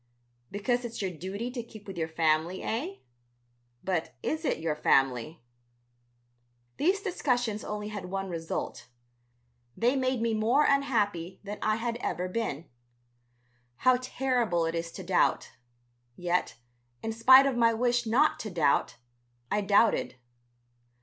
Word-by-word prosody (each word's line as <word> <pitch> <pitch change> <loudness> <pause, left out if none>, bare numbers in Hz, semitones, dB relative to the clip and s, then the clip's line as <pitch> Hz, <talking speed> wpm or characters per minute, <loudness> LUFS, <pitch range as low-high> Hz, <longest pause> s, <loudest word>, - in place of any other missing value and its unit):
"Because 240 +5 -1
it's 235 -1 -6
your 190 -2 -2
duty 190 +8 -5
to 245 -1 -4
keep 220 -2 -13
with 195 - -8
your 165 -2 -2
family, 160 +2 0
eh? 305 - -3 0.9
But 175 -8 -2
is 315 +1 -2
it - - +1
your 160 -1 -2
family?" 135 +1 +1 1.3
These 380 +6 +2
discussions 245 - -1
only 210 0 -4
had 205 -3 -6
one 195 +1 -3
result, 165 -2 -5 0.9
they 245 +4 +2
made 260 -2 0
me 230 0 0
more 230 +7 +3
unhappy 205 -10 0
than 205 +1 -6
I 215 - +2
had 230 +1 -2
ever 180 -6 -2
been. 180 -6 -3 1.1
How 255 - +3
terrible 245 -9 0
it 165 - -2
is 165 0 -3
to 190 - -7
doubt. 180 0 +1 0.6
Yet, 175 -8 -1 0.5
in 225 - -2
spite 260 +4 +7
of 275 -2 +1
my 230 -1 +4
wish 240 +1 +1
not 270 +8 +3
to 220 - -5
doubt, 165 -6 +1 0.6
I 210 - +2
doubted. 205 - +3
215 Hz, 135 wpm, -29 LUFS, 175-245 Hz, 1.3 s, spite